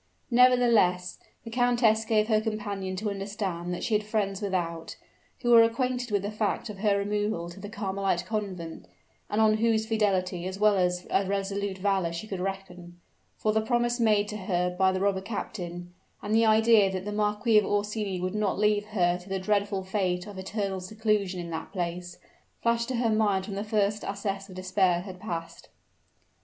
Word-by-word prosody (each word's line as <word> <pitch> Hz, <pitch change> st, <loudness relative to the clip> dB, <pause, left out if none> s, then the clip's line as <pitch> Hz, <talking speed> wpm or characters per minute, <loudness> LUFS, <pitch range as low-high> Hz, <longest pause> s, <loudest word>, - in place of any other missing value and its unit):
Nevertheless, 235 Hz, -8 st, +4 dB, 0.2 s
the 230 Hz, -, -8 dB
countess 235 Hz, -2 st, +3 dB
gave 215 Hz, -1 st, +2 dB
her 215 Hz, -2 st, +3 dB
companion 205 Hz, -4 st, -3 dB
to 210 Hz, +2 st, -2 dB
understand 195 Hz, -3 st, -4 dB
that 175 Hz, -, -4 dB
she 225 Hz, -, -1 dB
had 210 Hz, 0 st, +2 dB
friends 205 Hz, -2 st, -1 dB
without, 175 Hz, -5 st, -3 dB, 0.5 s
who 240 Hz, -, +2 dB
were 230 Hz, -1 st, +9 dB
acquainted 245 Hz, +2 st, 0 dB
with 205 Hz, -2 st, 0 dB
the 205 Hz, -, -3 dB
fact 210 Hz, 0 st, -2 dB
of 200 Hz, -, -11 dB
her 205 Hz, -1 st, +2 dB
removal 205 Hz, -3 st, -1 dB
to 195 Hz, -, -12 dB
the 205 Hz, +1 st, -7 dB
Carmelite 195 Hz, -4 st, -1 dB
convent, 180 Hz, -, -5 dB, 0.4 s
and 210 Hz, -, 0 dB
on 215 Hz, -1 st, +4 dB
whose 220 Hz, -1 st, +2 dB
fidelity 190 Hz, -5 st, 0 dB
as 190 Hz, +1 st, -5 dB
well 210 Hz, 0 st, +4 dB
as 180 Hz, -1 st, 0 dB
a 195 Hz, 0 st, +2 dB
resolute 200 Hz, 0 st, -2 dB
valor 190 Hz, -3 st, 0 dB
she 170 Hz, +5 st, -5 dB
could 195 Hz, -4 st, -5 dB
reckon; 180 Hz, -2 st, -6 dB, 0.4 s
for 215 Hz, -, 0 dB
the 220 Hz, -, +2 dB
promise 240 Hz, +1 st, 0 dB
made 210 Hz, -3 st, +3 dB
to 210 Hz, -, -4 dB
her 180 Hz, -3 st, -1 dB
by 190 Hz, 0 st, +3 dB
the 185 Hz, -, -1 dB
robber 195 Hz, -1 st, +1 dB
captain, 175 Hz, -4 st, -6 dB, 0.3 s
and 210 Hz, -, -2 dB
the 225 Hz, 0 st, +4 dB
idea 220 Hz, -2 st, +5 dB
that 185 Hz, 0 st, -4 dB
the 210 Hz, -, -3 dB
Marquis 210 Hz, +1 st, +3 dB
of 210 Hz, -, -1 dB
Orsini 205 Hz, -2 st, -1 dB
would 185 Hz, +1 st, -2 dB
not 210 Hz, -2 st, 0 dB
leave 210 Hz, 0 st, +2 dB
her 180 Hz, -4 st, +1 dB
to 180 Hz, +2 st, -14 dB
the 195 Hz, -, -1 dB
dreadful 200 Hz, 0 st, 0 dB
fate 185 Hz, -2 st, -1 dB
of 205 Hz, -2 st, -9 dB
eternal 195 Hz, 0 st, -3 dB
seclusion 205 Hz, -1 st, -1 dB
in 170 Hz, -1 st, -6 dB
that 160 Hz, 0 st, -5 dB
place, 175 Hz, -1 st, -4 dB, 0.5 s
flashed 235 Hz, 0 st, +1 dB
to 260 Hz, -, -2 dB
her 230 Hz, -1 st, +1 dB
mind 205 Hz, -3 st, +2 dB
when 200 Hz, -, -6 dB
the 200 Hz, -, -2 dB
first 210 Hz, -1 st, 0 dB
access 200 Hz, 0 st, -4 dB
of 185 Hz, -, -11 dB
despair 185 Hz, -1 st, +1 dB
had 185 Hz, -1 st, -9 dB
passed. 170 Hz, -5 st, -6 dB
200 Hz, 190 wpm, -27 LUFS, 185-215 Hz, 0.5 s, were